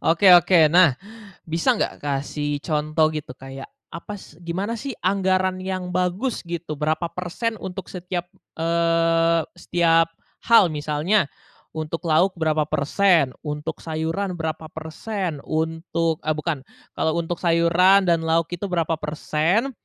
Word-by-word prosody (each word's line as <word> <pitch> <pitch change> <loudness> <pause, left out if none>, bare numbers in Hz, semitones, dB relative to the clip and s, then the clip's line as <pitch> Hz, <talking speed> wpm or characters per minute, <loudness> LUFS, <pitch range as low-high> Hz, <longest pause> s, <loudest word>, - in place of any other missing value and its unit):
Oke 170 +4 +4
oke, 175 -2 +6
nah 175 -7 +6 0.5
bisa 165 +10 +1
nggak - - -2
kasih 145 +1 -2
contoh 155 0 +1
gitu 150 -4 -5
kayak, 135 +1 -9 0.2
apa 205 +4 -7
s 160 -5 -15
gimana 180 +6 -3
sih 270 +2 -5
anggaran 185 -1 +1
yang 185 -1 -4
bagus 185 +7 -1
gitu? 170 -2 -4
Berapa 155 +3 0
persen 185 +6 -3
untuk 190 0 -6
setiap, 180 -1 -4 0.3
eee, 165 0 +2
setiap 165 -1 +2 0.4
hal? 220 -7 +6
Misalnya, 150 +5 +1 0.5
untuk 160 +2 -4
lauk 175 +5 +3
berapa 155 -2 +1
persen, 160 -1 +2
untuk 150 +1 -4
sayuran 165 +5 -2
berapa 160 0 -4
persen, 160 +2 -4
untuk 160 0 -1
eee, 155 - +1
bukan, 155 -3 -3 0.3
kalau 160 +1 0
untuk 170 +1 -3
sayuran 175 +3 +4
dan 165 -1 +2
lauk 165 0 +1
itu 175 +2 -5
berapa 165 -2 0
persen, 160 - 0
165 Hz, 135 wpm, -23 LUFS, 155-185 Hz, 0.5 s, oke